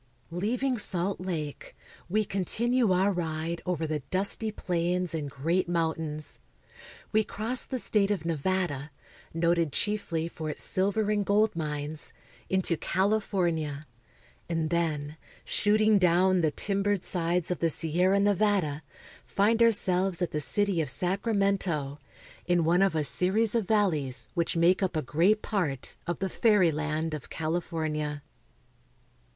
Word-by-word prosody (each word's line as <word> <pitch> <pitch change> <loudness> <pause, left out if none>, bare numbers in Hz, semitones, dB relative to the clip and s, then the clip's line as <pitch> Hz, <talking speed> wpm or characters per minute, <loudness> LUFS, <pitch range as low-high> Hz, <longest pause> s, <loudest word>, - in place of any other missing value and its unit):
LEAVING 240 +8 -1
Salt 195 -1 +1
Lake, 160 -6 -5 0.3
we 215 +3 +1
continue 230 +5 0
our 190 +2 +3
ride 165 -1 -3
over 170 -3 -1
the 155 -1 -2
^ - - -18
dusty 200 +3 0
plains 180 -2 -2
and 150 -3 -3
great 170 +7 -1
mountains. 160 -3 -2 0.7
We 220 0 +3
cross 225 +4 -2
the 260 - -4
state 210 -4 +2
of 195 -6 -2
Nevada, 165 -3 -2 0.4
noted 170 -1 +1
chiefly 175 -4 -2
for 160 -2 -6
its - - 0
silver 205 +2 0
and 205 -1 +1
gold 210 +1 +2
mines, 150 -1 -5 0.4
into 190 -3 +1
California, 175 -8 -1 0.6
and 165 -2 -1
then, 155 -3 -2 0.3
shooting 215 0 +3
down 180 +1 +3
the 160 - +2
timbered 200 +4 -1
sides 175 0 -1
of 180 - -2
the 165 - +1
Sierra 180 +6 +1
Nevada, 200 -7 +1 0.4
find 220 +3 +1
ourselves 190 -5 +5
at 175 - -1
the 150 - -2
city 200 +1 +1
of 150 - -2
Sacramento, 185 - 0 0.5
in 175 -1 +2
one 170 +3 +3
of 195 -4 +2
a 155 - +1
series 190 - +4
of 225 -5 0
valleys 160 - 0
which 170 -1 -1
make 175 +3 +3
up 190 -3 -1
a 155 - -1
great 175 - +2
part 165 - -2
of 175 - -2
the 195 - -2
fairyland 160 -8 +1
of 150 -4 -7
California. 155 -3 -3
175 Hz, 135 wpm, -28 LUFS, 160-200 Hz, 0.7 s, ourselves